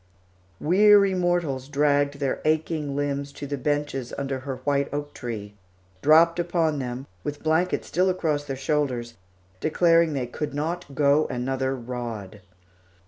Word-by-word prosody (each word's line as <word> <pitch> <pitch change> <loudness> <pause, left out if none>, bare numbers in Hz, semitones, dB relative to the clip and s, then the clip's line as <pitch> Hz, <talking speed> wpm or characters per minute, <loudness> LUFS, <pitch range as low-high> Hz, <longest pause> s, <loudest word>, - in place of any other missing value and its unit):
Weary 200 +3 +5
mortals 175 -8 0
dragged 145 0 +2
their 140 -2 -2
aching 155 -2 0
limbs 140 0 -2
to 145 - -7
the 145 0 -3
benches 145 -2 -2
under 135 -1 -2
her 135 0 -5
white 140 -1 +1
oak 145 +1 -4
tree, 105 -5 -6 0.5
dropped 165 +3 +5
upon 170 -3 +1
them, 125 0 -4 0.2
with 145 0 -5
blankets 160 +3 +1
still 185 +2 +2
across 155 -5 0
their 135 - -4
shoulders, 135 -4 -1 0.5
declaring 165 - +3
they 130 -3 -1
could 140 +4 -5
not 155 -1 -3
go 145 +2 +3
another 130 +1 -2
rod. 115 -5 -6
145 Hz, 140 wpm, -25 LUFS, 135-160 Hz, 0.5 s, Weary